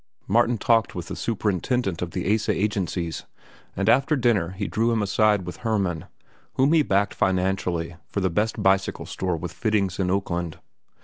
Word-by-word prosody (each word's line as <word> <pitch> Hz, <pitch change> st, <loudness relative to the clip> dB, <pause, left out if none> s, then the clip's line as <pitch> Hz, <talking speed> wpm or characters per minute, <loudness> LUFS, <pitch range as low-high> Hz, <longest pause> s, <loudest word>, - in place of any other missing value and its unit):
Martin 120 Hz, +3 st, +3 dB
talked 115 Hz, +1 st, +2 dB
with 85 Hz, -2 st, -6 dB
the -, -, -4 dB
superintendent 105 Hz, -2 st, -1 dB
of 90 Hz, -, -2 dB
the 90 Hz, +3 st, 0 dB
Asa 110 Hz, -, +1 dB
agencies, 95 Hz, -5 st, -2 dB, 0.5 s
and 100 Hz, +1 st, -1 dB
after 135 Hz, +6 st, +4 dB
dinner 115 Hz, -, +2 dB
he 95 Hz, +2 st, -4 dB
drew 115 Hz, +2 st, +1 dB
him 110 Hz, -2 st, +1 dB
aside 105 Hz, -1 st, +2 dB
with 90 Hz, -1 st, -7 dB
Hermann, 100 Hz, -8 st, -1 dB, 0.5 s
whom 135 Hz, +4 st, +3 dB
he 160 Hz, -, +5 dB
backed 100 Hz, -6 st, +1 dB
financially 90 Hz, -3 st, 0 dB
for -, -, -3 dB
the 95 Hz, -2 st, 0 dB
best 105 Hz, +5 st, -1 dB
bicycle 95 Hz, 0 st, +1 dB
store 90 Hz, -3 st, -2 dB
with 85 Hz, +1 st, -6 dB
fittings 100 Hz, -5 st, 0 dB
in 90 Hz, -2 st, +1 dB
Oakland. 85 Hz, -4 st, -2 dB
95 Hz, 170 wpm, -24 LUFS, 90-110 Hz, 0.5 s, he